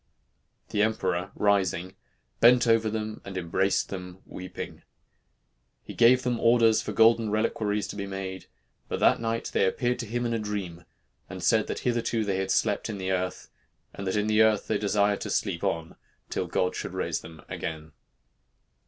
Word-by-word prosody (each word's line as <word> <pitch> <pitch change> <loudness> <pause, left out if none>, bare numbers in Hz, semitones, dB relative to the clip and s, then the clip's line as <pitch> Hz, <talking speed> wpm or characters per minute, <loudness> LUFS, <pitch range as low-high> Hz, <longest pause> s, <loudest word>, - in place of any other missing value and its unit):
The 105 - 0
emperor, 100 -4 0
rising, 95 -3 +1 0.5
bent 120 +1 +6
over 115 -1 +3
them 110 0 -4
and 95 -1 -7
embraced 95 +2 0
them 90 -1 -8
weeping. 90 0 -8 1.0
He - - -9
gave 125 +2 +5
them 120 -2 0
orders 115 -2 +4
for - - -5
golden 115 0 +4
reliquaries 105 -1 0
to - - -6
be 100 -1 -4
made, 95 -1 -6 0.4
but - - -3
that - - +4
night 115 0 -2
they - - +3
appeared 120 +6 0
to 115 - -4
him 120 +3 -2
in 115 - -1
a 115 - 0
dream, 95 -5 -5 0.4
and - - -7
said - - +3
that - - -4
hitherto 115 -2 0
they 100 -2 0
had 95 0 -2
slept 105 +2 +1
in 105 - -4
the 95 0 -2
earth, 95 0 -3 0.4
and 100 - -6
that 95 - 0
in 105 0 +1
the 110 0 +3
earth 110 -2 +3
they - - 0
desired 100 0 +1
to - - -4
sleep 90 -5 -1
on 80 -1 -2 0.4
till - - -2
God 90 0 0
should - - -5
raise - - -2
them 80 -2 -12
again." 80 -1 -6
105 Hz, 180 wpm, -27 LUFS, 95-115 Hz, 1.0 s, bent